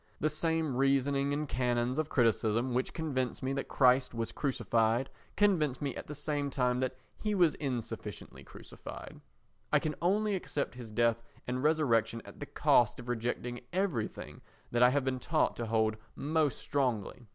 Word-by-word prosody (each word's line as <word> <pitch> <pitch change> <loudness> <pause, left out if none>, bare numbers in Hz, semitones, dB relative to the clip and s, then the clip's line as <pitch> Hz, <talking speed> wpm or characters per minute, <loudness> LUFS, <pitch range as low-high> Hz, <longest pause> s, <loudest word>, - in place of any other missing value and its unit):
The 155 - +1
same 160 -2 0
reasoning 135 +1 +2
and 150 +1 -1
canons 125 +1 0
of 155 -1 -1
criticism 115 0 +2
which 125 +1 0
convince 130 -7 -2
me 130 +1 0
that 135 - -3
Christ 125 -2 +3
was 115 -1 -2
crucified 120 -3 +1 0.3
convince 165 -10 +3
me 140 -3 -2
at - - -7
the 150 - -6
same 145 -1 -2
time 125 -2 +1
that 130 0 -2 0.2
he 210 -1 -1
was 175 -5 +4
insufficiently 130 -6 -5
crucified. - - -10 0.5
I - - +6
can 155 - -1
only 205 +4 +2
accept 160 -6 -2
his 120 -2 -9
death 115 +1 +2 0.2
and 125 +1 -2
resurrection 130 -7 +2
at - - -12
the - - -6
cost 120 -3 +3
of 120 - -8
rejecting 120 +1 -2
everything 175 - -2 0.3
that 120 - +1
I 125 - +8
have 140 +1 +1
been 130 -1 -1
taught 155 +5 +1
to 115 - -3
hold 110 -1 +1 0.2
most 150 -1 +1
strongly. 125 -4 -2
130 Hz, 165 wpm, -32 LUFS, 120-150 Hz, 0.5 s, I